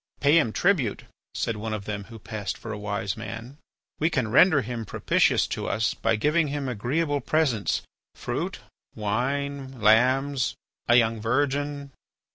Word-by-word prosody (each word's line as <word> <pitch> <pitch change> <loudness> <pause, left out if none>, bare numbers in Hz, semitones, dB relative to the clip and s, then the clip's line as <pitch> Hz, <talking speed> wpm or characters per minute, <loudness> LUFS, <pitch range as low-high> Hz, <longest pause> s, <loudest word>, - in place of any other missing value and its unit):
"Pay 145 +4 +5
him 115 -8 +1
tribute," 150 - +1 0.3
said 115 -2 -1
one 110 +1 -3
of 100 -2 -7
them 105 -2 -4
who 115 +1 -11
passed 105 -1 -5
for 115 - -7
a 105 - -5
wise 100 -1 -2
man. 115 +5 -8 0.4
"We 160 - +2
can 130 -9 0
render 145 +1 +6
him 115 0 -4
propitious - - +2
to - - -3
us 110 +2 0
by 115 0 0
giving 150 +8 +2
him 140 -1 -3
agreeable 140 +6 -1
presents, 130 -7 +1 0.3
fruits, - - -3 0.4
wine, 135 +5 -2
lambs, 130 +5 +3 0.3
a 120 - +5
young 115 -2 +3
virgin." 140 +4 -1
125 Hz, 150 wpm, -26 LUFS, 110-145 Hz, 0.4 s, render